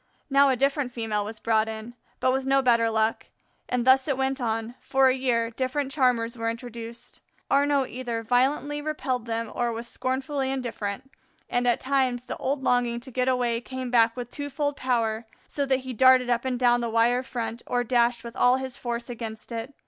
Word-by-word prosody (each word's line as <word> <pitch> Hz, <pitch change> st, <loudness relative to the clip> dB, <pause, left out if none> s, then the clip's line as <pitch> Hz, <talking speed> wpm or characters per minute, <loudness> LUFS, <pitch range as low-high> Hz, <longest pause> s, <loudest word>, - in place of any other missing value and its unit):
Now 275 Hz, 0 st, +6 dB
a 260 Hz, -, +3 dB
different 275 Hz, 0 st, 0 dB
female 220 Hz, -3 st, -2 dB
was 215 Hz, +1 st, -7 dB
brought 220 Hz, -1 st, +1 dB
in, 220 Hz, +2 st, -7 dB, 0.3 s
but 255 Hz, -, +2 dB
with 265 Hz, 0 st, 0 dB
no 270 Hz, 0 st, +2 dB
better 230 Hz, -2 st, +4 dB
luck; 220 Hz, 0 st, 0 dB, 0.4 s
and 250 Hz, -1 st, 0 dB
thus 260 Hz, +1 st, +5 dB
it 275 Hz, -3 st, 0 dB
went 265 Hz, 0 st, -1 dB
on 225 Hz, 0 st, -2 dB
for 265 Hz, 0 st, +3 dB
a 255 Hz, -, +2 dB
year 235 Hz, -3 st, 0 dB
different 265 Hz, +3 st, -2 dB
charmers 250 Hz, -4 st, +1 dB
were 230 Hz, -1 st, -1 dB
introduced. 230 Hz, 0 st, -8 dB, 0.3 s
Arnaux 280 Hz, -1 st, +3 dB
either 240 Hz, -2 st, -4 dB
violently 275 Hz, +5 st, +1 dB
repelled 265 Hz, -6 st, -2 dB
them 230 Hz, 0 st, -3 dB
or 240 Hz, -1 st, 0 dB
was 230 Hz, +1 st, -5 dB
scornfully 265 Hz, +2 st, -2 dB
indifferent, 245 Hz, -1 st, -4 dB, 0.4 s
and 245 Hz, 0 st, +1 dB
at 240 Hz, -, +3 dB
times 260 Hz, -2 st, 0 dB
the -, -, -6 dB
old 270 Hz, +1 st, -2 dB
longing 245 Hz, -2 st, +1 dB
to 260 Hz, +2 st, -10 dB
get 255 Hz, +1 st, 0 dB
away, 245 Hz, -2 st, +1 dB
came 255 Hz, 0 st, -6 dB
back 230 Hz, 0 st, +4 dB
with 245 Hz, -1 st, -6 dB
twofold 285 Hz, 0 st, -3 dB
power, 230 Hz, -4 st, -1 dB, 0.2 s
so 280 Hz, -1 st, -2 dB
that 265 Hz, -1 st, +2 dB
he 260 Hz, 0 st, -6 dB
darted 255 Hz, +1 st, +5 dB
up 240 Hz, +1 st, 0 dB
and 255 Hz, -1 st, -1 dB
down 240 Hz, -1 st, +3 dB
the 235 Hz, -, -2 dB
wire 230 Hz, +2 st, +3 dB
front 235 Hz, -2 st, -4 dB
or 245 Hz, 0 st, +1 dB
dashed 240 Hz, 0 st, +2 dB
with 235 Hz, +1 st, -8 dB
all 250 Hz, 0 st, +4 dB
his 260 Hz, -1 st, -6 dB
force 235 Hz, -1 st, -4 dB
against 225 Hz, -2 st, -7 dB
it. 230 Hz, +3 st, -4 dB
245 Hz, 195 wpm, -26 LUFS, 230-265 Hz, 0.4 s, Now